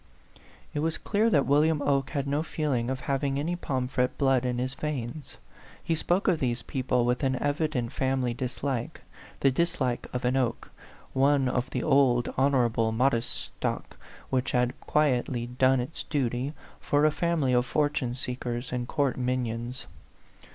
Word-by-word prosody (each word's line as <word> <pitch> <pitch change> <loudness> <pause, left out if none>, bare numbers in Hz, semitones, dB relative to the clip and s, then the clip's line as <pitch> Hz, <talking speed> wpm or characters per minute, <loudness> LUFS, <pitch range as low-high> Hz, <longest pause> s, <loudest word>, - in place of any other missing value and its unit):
It - - -1
was 160 +1 0
clear 220 +2 +1
that 145 -10 +3
William 150 +2 +3
Oke 140 -1 +1
had 140 -3 -2
no 140 +2 0
feeling 145 -7 -1
of 130 -1 -3
having 135 0 -1
any 165 +5 -1
Pomfret 130 -5 -1
blood 135 -2 +3
in 125 -1 -1
his 130 +1 -2
veins; 145 -1 -5 0.5
he 165 - 0
spoke 175 +4 +1
of 175 -4 +3
these 120 -2 -1
people 125 -2 0
with 125 +1 +1
an 130 -2 +1
evident 145 -4 -1
family 130 -3 0
dislike 125 0 -3 0.4
the 135 - +5
dislike 130 -5 0
of 125 0 -3
an 125 +1 +2
Oke, 125 -3 -1 0.4
one 135 0 +3
of 125 0 -1
the 125 - -2
old, 135 -4 +3
honorable, 120 -5 +2
modest 120 0 +1 0.3
stock, - - -3 0.4
which 130 0 0
had 125 0 +2
quietly 125 -5 +1
done 130 +2 +2
its 125 +6 -4
duty, 130 -1 -1 0.3
for 145 +1 +2
a 155 - +5
fam 170 0 0
ily 130 -1 +2
of 125 0 +2
fortune 145 -5 0
seekers 125 -1 -3
and 125 -1 -2
court 140 -2 0
minions. 125 0 -2
130 Hz, 160 wpm, -28 LUFS, 125-145 Hz, 0.5 s, the